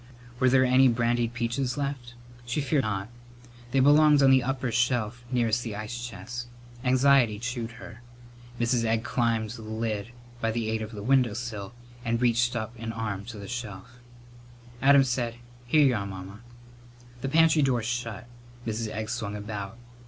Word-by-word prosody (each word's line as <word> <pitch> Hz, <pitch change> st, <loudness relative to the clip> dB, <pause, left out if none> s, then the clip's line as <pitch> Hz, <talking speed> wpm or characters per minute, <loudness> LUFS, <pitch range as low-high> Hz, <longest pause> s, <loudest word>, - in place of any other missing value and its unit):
Were 130 Hz, -, +4 dB
there 130 Hz, 0 st, +5 dB
any 130 Hz, +1 st, +5 dB
brandied 120 Hz, 0 st, +1 dB
peaches 120 Hz, +3 st, -1 dB
left? 135 Hz, -4 st, -4 dB, 0.3 s
She 120 Hz, +5 st, -2 dB
feared 145 Hz, 0 st, +1 dB
not. 100 Hz, -4 st, -2 dB, 0.6 s
They 135 Hz, +2 st, +2 dB
belonged 145 Hz, +1 st, +6 dB
on 135 Hz, -, +7 dB
the 130 Hz, 0 st, +6 dB
upper 130 Hz, 0 st, -2 dB
shelf 120 Hz, 0 st, 0 dB
nearest 120 Hz, -2 st, +1 dB
the 115 Hz, -4 st, -5 dB
ice 110 Hz, +3 st, -5 dB
chest. 120 Hz, +3 st, -7 dB, 0.4 s
Anxiety 130 Hz, -3 st, +4 dB
chewed 120 Hz, 0 st, -4 dB
her. 115 Hz, 0 st, -11 dB, 0.6 s
Mrs. 120 Hz, 0 st, +2 dB
Egg 115 Hz, 0 st, +1 dB
climbed 115 Hz, -5 st, 0 dB
the 115 Hz, -1 st, -8 dB
lid 110 Hz, 0 st, -3 dB, 0.3 s
by 115 Hz, -, 0 dB
the 110 Hz, -1 st, -1 dB
aid 110 Hz, 0 st, -1 dB
of 110 Hz, 0 st, -5 dB
the 100 Hz, -1 st, -7 dB
window 125 Hz, -2 st, +3 dB
sill 110 Hz, -3 st, -5 dB, 0.3 s
and 115 Hz, -1 st, 0 dB
reached 120 Hz, 0 st, +2 dB
up 110 Hz, 0 st, -3 dB
an 115 Hz, 0 st, -4 dB
arm 105 Hz, -3 st, -4 dB
to 115 Hz, -1 st, -8 dB
the 100 Hz, -1 st, -8 dB
shelf. 120 Hz, 0 st, -7 dB, 0.8 s
Adam 140 Hz, 0 st, +7 dB
said, 120 Hz, -2 st, -1 dB, 0.3 s
"Here 150 Hz, +3 st, +5 dB
y'are, 110 Hz, -7 st, +1 dB
Mamma." 95 Hz, +1 st, -8 dB, 0.8 s
The 135 Hz, -, -2 dB
pantry 160 Hz, +1 st, +5 dB
door 130 Hz, -4 st, +2 dB
shut. 115 Hz, -2 st, -3 dB, 0.4 s
Mrs. 110 Hz, 0 st, -2 dB
Egg 110 Hz, 0 st, -4 dB
swung 110 Hz, -3 st, -3 dB
about. 105 Hz, 0 st, -6 dB
120 Hz, 165 wpm, -27 LUFS, 110-125 Hz, 0.8 s, on